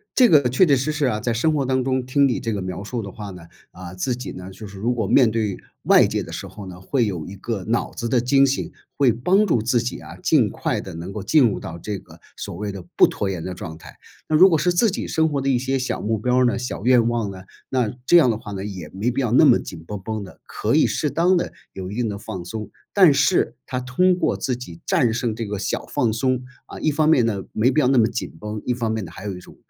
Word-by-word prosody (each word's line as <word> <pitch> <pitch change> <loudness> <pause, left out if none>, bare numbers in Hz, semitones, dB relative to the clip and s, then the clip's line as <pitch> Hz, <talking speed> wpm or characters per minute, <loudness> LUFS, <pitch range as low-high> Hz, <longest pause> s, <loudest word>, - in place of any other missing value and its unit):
这 250 -2 +6
个 150 -5 +6
确 130 +9 +4
确 145 -5 +4
实 135 +4 -1
实 150 -2 0
啊， 110 -4 0
在 120 +1 -1
生 155 +8 +1
活 140 -3 0
当 130 0 +1
中 130 -1 -1
听 140 +2 +3
你 125 - -1
这 115 -2 -3
个 100 - -3
描 95 +1 -5
述 120 +2 -4
的 100 -2 -7
话 105 -2 -8
呢， 90 -2 -11 0.3
啊， 90 -1 -10
自 120 +7 -2
己 125 - -7
呢， 90 +1 -8
就 100 +3 -10
是 100 -1 -11
如 120 +5 0
果 110 -5 -2
面 125 -4 +5
对 110 -4 -1 0.3
外 - - +6
界 - - -2
的 - - -10
时 - - -6
候 105 - -10
呢， 90 -1 -9
会 120 +3 +1
有 90 -7 -3
一 100 - -8
个 100 0 -4
脑 115 +2 -1
子 115 0 -4
的 125 - +3
惊 135 +3 +4
醒， 135 - -2 0.3
会 135 -4 +4
帮 185 - +2
助 125 - +2
自 120 +2 +2
己 120 +1 -3
啊， - - -11
尽 - - +3
快 - - -2
地 - - -9
能 85 +4 -6
够 105 - -5
进 130 +4 +4
入 100 - -2
到 85 - -7
这 100 +2 -5
个 80 -1 -17 0.2
所 - - -6
谓 105 +2 -4
的 95 -2 -8
不 - - +7
拖 100 - -3
延 90 -4 -4
的 95 - -4
状 85 -3 -8
态。 - - -14 0.3
那 155 - +1
如 185 +4 +8
果 160 - +3
是 175 +4 +1
自 220 +6 +3
己 195 - -4
生 160 0 +1
活 145 -2 -1
的 135 - -3
一 125 -2 +2
些 135 +1 -1
小 130 0 -2
目 110 +1 0
标 125 +4 +1
儿 130 - +4
呢、 120 - +1
小 125 -4 -5
愿 120 -2 +4
望 115 -3 -1
呢， 95 -1 -9 0.3
那 125 -4 0
这 175 - +7
样 135 -8 +5
的 110 - -2
话 105 - -9
呢， 95 0 -5
也 95 -7 -7
没 105 +8 -2
必 135 - -1
要 120 -3 -1
那 - - +6
么 - - +6
紧 80 - -9
绷 105 0 -6
绷 110 +1 -4
的， 95 - -13
可 - - -2
以 - - +4
适 150 -3 -1
当 175 +4 +3
地 - - -2 0.2
有 95 0 -6
一 105 - -6
定 120 -3 -1
的 100 - -4
放 100 -4 -7
松。 105 +3 -7 0.2
但 185 -7 +6
是 140 -4 +2
它 125 - -2
通 130 +9 +2
过 - - +1
自 130 -3 -2
己 85 -9 -10
战 120 -3 +2
胜 115 -2 -1
这 115 - -4
个 100 -1 -4
小 - - -2
放 115 -3 0
松， 130 +2 0 0.2
啊， - - -10
一 - - +1
方 155 +1 +1
面 150 -7 +5
呢， 100 -4 -2
没 115 +4 +2
必 145 - +2
要 130 - +3
那 130 -2 +4
么 110 - +4
紧 - - -5
绷， 105 0 -5
一 125 - +1
方 115 -2 -2
面 110 -4 -2
呢， 80 - -10
还 95 - -11
有 95 -3 -4
一 - - -9
种， - - -15
115 Hz, 305 characters per minute, -22 LUFS, 100-130 Hz, 0.3 s, 如